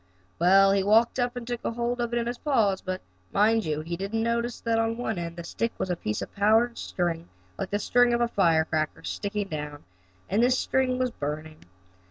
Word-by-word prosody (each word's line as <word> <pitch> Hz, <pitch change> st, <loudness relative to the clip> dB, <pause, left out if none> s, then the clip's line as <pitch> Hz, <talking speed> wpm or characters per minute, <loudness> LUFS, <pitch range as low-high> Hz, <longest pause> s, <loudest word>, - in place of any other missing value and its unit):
Well, 195 Hz, +3 st, +6 dB
he 195 Hz, 0 st, +3 dB
walked 225 Hz, +6 st, +3 dB
up 245 Hz, 0 st, 0 dB
and 245 Hz, -1 st, -5 dB
took 240 Hz, 0 st, -4 dB
hold 240 Hz, +1 st, -2 dB
of 240 Hz, -1 st, -2 dB
it 240 Hz, -, 0 dB
in 235 Hz, -, 0 dB
his 240 Hz, +1 st, -4 dB
paws, 215 Hz, -10 st, +1 dB
but, 185 Hz, 0 st, -4 dB, 0.3 s
mind 220 Hz, +2 st, +3 dB
you, 155 Hz, -1 st, -1 dB
he 170 Hz, +2 st, -4 dB
didn't 200 Hz, +5 st, -2 dB
notice 235 Hz, +1 st, -1 dB
that 230 Hz, -1 st, +1 dB
on 225 Hz, 0 st, 0 dB
one 220 Hz, -6 st, -2 dB
end 170 Hz, -1 st, -4 dB
of -, -, -19 dB
the 170 Hz, -, -7 dB
stick 230 Hz, +7 st, -2 dB
was 185 Hz, -, -2 dB
a -, -, +1 dB
piece 105 Hz, -9 st, -3 dB
of -, -, -10 dB
powder 220 Hz, +4 st, +4 dB
string, 175 Hz, -6 st, -3 dB, 0.3 s
like -, -, -3 dB
the 205 Hz, -, 0 dB
string 245 Hz, +3 st, +3 dB
of 235 Hz, 0 st, +1 dB
a 240 Hz, -, +3 dB
firecracker, 160 Hz, -6 st, +1 dB
sticking 205 Hz, -1 st, -3 dB
down, 150 Hz, -2 st, -5 dB, 0.4 s
and 205 Hz, +4 st, +1 dB
this 250 Hz, +1 st, +4 dB
string 255 Hz, -1 st, +1 dB
was 255 Hz, -1 st, 0 dB
burning. 155 Hz, -1 st, -5 dB
210 Hz, 220 wpm, -27 LUFS, 175-235 Hz, 0.4 s, Well